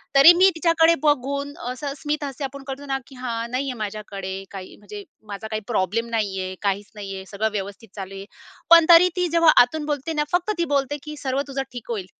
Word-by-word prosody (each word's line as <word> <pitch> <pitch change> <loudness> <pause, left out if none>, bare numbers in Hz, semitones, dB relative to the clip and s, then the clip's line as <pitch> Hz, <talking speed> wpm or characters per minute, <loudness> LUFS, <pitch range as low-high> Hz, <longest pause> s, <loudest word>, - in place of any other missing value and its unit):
तरी 280 +5 +10
मी 380 +1 +7
तिच्याकडे 330 0 +4
बघून 280 0 0 0.2
असं 280 +2 -5
स्मिथ 300 0 -3
हस्य 275 0 -6
आपण 275 +1 -8
करतो 275 +1 -6
ना, 270 -1 -1
की 270 - -14
"हां, 235 -2 -4
नाहीये 260 0 -2
माझ्याकडे 200 -2 -6 0.2
काही." 190 -2 -9
म्हणजे 205 0 -10 0.3
"माझा 200 +2 -6
काही 215 0 -4
प्रॉब्लेम 230 +2 -1
नाहीये, 195 -4 -2
काहीच 200 0 -2
नाहीये, 195 -2 -7
सगळं 215 +2 -2
व्यवस्थित 200 +2 -6
चालू 195 -1 -7
आहे." 195 - -8 0.4
पण 335 -1 +8
तरी 345 +2 +8
ती 360 -1 +1
जेव्हा 335 -2 +6
आतून 295 +5 0
बोलते 295 +1 -3
ना, 300 -1 +1
फक्त 360 +4 +1
ती 340 - +1
बोलते 280 +1 0
की 300 0 -7
"सर्व 265 +1 0
तुझं 275 0 -3
ठीक 245 -2 -9
होईल. 205 -5 -3
260 Hz, 200 wpm, -23 LUFS, 205-295 Hz, 0.4 s, तरी